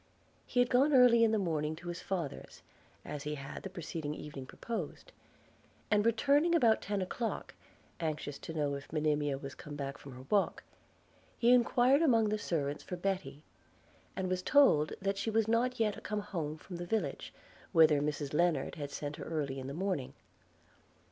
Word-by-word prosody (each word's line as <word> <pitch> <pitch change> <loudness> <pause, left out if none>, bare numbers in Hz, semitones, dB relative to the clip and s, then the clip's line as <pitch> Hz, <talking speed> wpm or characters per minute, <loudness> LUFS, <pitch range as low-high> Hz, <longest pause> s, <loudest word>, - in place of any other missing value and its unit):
He 245 - 0
had 245 0 +3
gone 270 +4 +4
early 245 -2 +7
in 225 - +4
the 220 - +2
morning 160 -5 -1
to 170 +2 -11
his 175 - -5
father's, 175 -7 -5 0.4
as 145 - -5
he 150 +1 -3
had 135 -1 -7
the 190 - -6
preceding 160 -4 -5
evening 145 -4 -8
proposed: 235 - -6 0.8
and 210 -1 +4
returning 285 +9 +3
about 230 -9 +4
ten 200 -2 -1
o'clock, 225 +5 -4 0.5
anxious 150 -3 -3
to 160 - -7
know 145 -2 0
if 140 0 -7
Monimia 150 -2 0
was 135 -1 -7
come 150 - -9
back 140 -1 -5
from 140 - -10
her 130 +1 -11
walk, 205 -2 +2 0.7
he 240 +1 +4
enquired 250 +3 +4
among 230 -9 +4
the 215 0 -1
servants 145 -6 -2
for 180 - -6
Betty; 175 -6 -3 0.7
and 190 -1 -2
was 185 0 -1
told 185 - +4
that 195 0 -1
she 200 - -1
was 220 0 +2
not 235 +2 +1
yet 215 -2 0
come 210 0 -3
home 165 -7 -4
from 175 +2 -9
the 175 0 -6
village, 175 -9 -2 0.4
whither 155 -3 +5
Mrs 145 -1 -2
Lennard 165 -3 +1
had 145 -3 -5
sent 145 +1 -5
her - - -7
early 145 -4 -2
in 130 - -6
the - - -5
morning. 175 -4 -2
175 Hz, 180 wpm, -32 LUFS, 150-220 Hz, 0.8 s, early